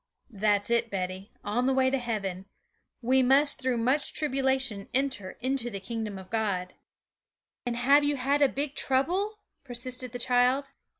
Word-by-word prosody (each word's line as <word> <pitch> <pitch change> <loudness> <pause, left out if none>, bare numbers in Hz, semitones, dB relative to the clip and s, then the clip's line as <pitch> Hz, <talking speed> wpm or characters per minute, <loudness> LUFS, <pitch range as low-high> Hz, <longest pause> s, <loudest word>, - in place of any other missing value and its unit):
'That's 205 0 +1
it, 235 0 +2
Betty, 185 0 -4
on 245 +5 0
the 265 - +2
way 260 0 +3
to 270 - +1
heaven. 200 -6 -3 0.6
We 260 +3 +4
must 275 +3 +4
through 255 -2 +1
much 260 +6 +1
tribulation 265 -7 -1
enter 260 -8 -1
into 260 -1 0
the 200 -4 -5
kingdom 215 0 -5
of 185 -1 -12
God.' 200 -5 -1 0.9
'And 240 - -1
have 280 +4 +5
you 290 0 +1
had 280 +2 0
a 280 - +5
big 280 +1 -3
trouble?' 360 +13 0 0.3
persisted 255 -1 -3
the 245 - -5
child. 250 +3 +2
250 Hz, 160 wpm, -28 LUFS, 215-270 Hz, 0.9 s, have